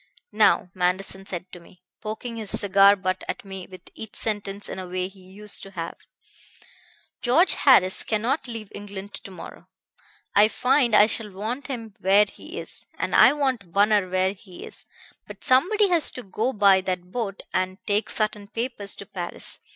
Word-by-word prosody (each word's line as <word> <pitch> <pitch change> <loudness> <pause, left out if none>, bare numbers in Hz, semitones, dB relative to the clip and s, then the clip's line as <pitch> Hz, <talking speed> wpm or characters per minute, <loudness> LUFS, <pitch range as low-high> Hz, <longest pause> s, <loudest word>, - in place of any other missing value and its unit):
"'Now,' 180 - +3
Manderson 190 +2 -1
said 180 0 -6
to 180 - -10
me, 175 +1 -20 0.2
poking 225 +2 -5
his 215 -3 -5
cigar 200 0 +6
butt 185 -1 -2
at - - -4
me 190 -2 -8
with 185 -1 -13
each 220 -2 -9
sentence 205 -2 -3
in - - -6
a 185 - -6
way 185 0 -2
he 195 0 -17
used 195 +3 -5
to 195 - -9
have, 170 -4 -5 1.3
'George 280 +9 +4
Harris 205 -8 +5
cannot 230 +7 -1
leave 225 -4 -7
England 205 0 -8
to - - -8
morrow. 185 - -11 0.7
I 205 +1 +6
find 245 +2 +2
I 210 - +8
shall 220 -1 -1
want 220 +8 -4
him 230 -6 -6
where 195 +2 +5
he 320 - -11
is. - - -7
And - - -2
I - - +7
want 260 - -1
Bunner 205 0 +3
where 185 +1 +1
he 190 -2 -12
is. - - -8 0.4
But - - -11
somebody 385 +11 +4
has 340 -3 +3
got 250 - -7
to 190 - -21
go 230 +6 0
by 200 -4 +5
that 180 -1 -4
boat 205 -5 -4
and 185 0 -1
take 205 +1 0
certain 215 -1 -2
papers 230 -2 -4
to - - -9
Paris. - - -4
205 Hz, 180 wpm, -25 LUFS, 190-230 Hz, 1.3 s, I